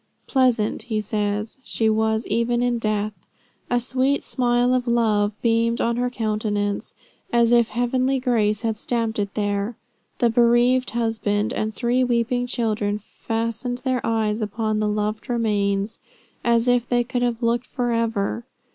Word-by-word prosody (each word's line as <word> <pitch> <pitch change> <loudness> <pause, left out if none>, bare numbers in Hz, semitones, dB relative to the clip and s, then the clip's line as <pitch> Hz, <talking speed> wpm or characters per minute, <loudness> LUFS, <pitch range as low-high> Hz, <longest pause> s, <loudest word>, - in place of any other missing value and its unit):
"Pleasant," 250 -5 +2
he 215 -2 0
says, 210 +2 -2
"she 225 -2 0
was 220 +1 +1
even 235 +2 +1
in 245 -1 +1
death. 215 -1 -1 0.6
A 245 - +2
sweet 260 +3 +1
smile 245 -1 +2
of 250 -1 0
love 215 -3 +1
beamed 230 0 +2
on 235 0 0
her 250 0 0
countenance, 210 -3 -2 0.4
as 235 -1 +3
if 235 -1 +4
heavenly 255 +3 0
grace 220 -5 +1
had 225 -1 -1
stamped 230 -1 -1
it 200 -1 -3
there. 205 +1 -1 0.4
The 235 -1 +2
bereaved 240 +2 +3
husband 225 -3 -1
and 215 0 -1
three 245 +3 +1
weeping 245 0 0
children 215 -4 -1
fastened 230 +3 -3
their 255 -2 0
eyes 220 -1 0
upon 215 0 -1
the 215 - +1
loved 210 +2 -2
remains, 205 -3 0 0.4
as 235 0 +2
if 245 -1 +2
they 245 -1 +2
could 245 +1 -3
have 240 -1 -1
looked 235 +1 +1
forever." 230 -3 -1
230 Hz, 145 wpm, -23 LUFS, 215-245 Hz, 0.6 s, if